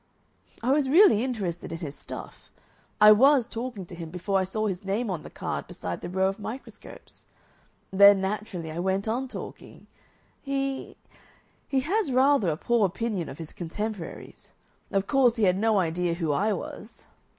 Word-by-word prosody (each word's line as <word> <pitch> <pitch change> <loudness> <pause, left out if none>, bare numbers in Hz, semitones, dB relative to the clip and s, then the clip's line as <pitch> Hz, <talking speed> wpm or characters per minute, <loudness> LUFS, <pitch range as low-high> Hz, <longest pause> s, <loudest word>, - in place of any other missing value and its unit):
"I 250 - +2
was 280 -1 +2
really 315 - +6
interested 195 -12 -3
in 165 - -4
his 155 -5 -6
stuff. - - -10 0.5
I 210 0 +9
WAS 265 +3 +6
talking 230 -4 -6
to 175 - -13
him 170 -2 -7
before 180 +3 -1
I 190 - 0
saw 215 +3 -2
his 190 -3 -3
name 200 +3 -1
on 170 -4 -3
the - - -10
card - - -5
beside 90 -1 -6
the - - -6
row 190 +1 +1
of 195 +2 -3
microscopes. 230 +5 -10 0.6
Then, 200 +1 +7
naturally, 190 -4 -4
I 160 - -5
went 190 +3 -1
on 245 +4 -1
talking. - - -10 0.6
He 275 -1 -3 0.7
he 270 -1 +1
has 355 +2 0
rather 260 -6 +4
a 155 - -1
poor 230 +1 +2
opinion 195 -2 -3
of 135 - -9
his 160 -2 -8
contemporaries. 195 +2 -6 0.4
Of 195 0 0
course, 250 -1 +3
he 225 - -1
had 185 -1 +3
no 220 0 +2
idea 175 -1 0
who 165 -3 -1
I 205 +9 +1
was." - - -7
205 Hz, 175 wpm, -26 LUFS, 180-245 Hz, 0.7 s, I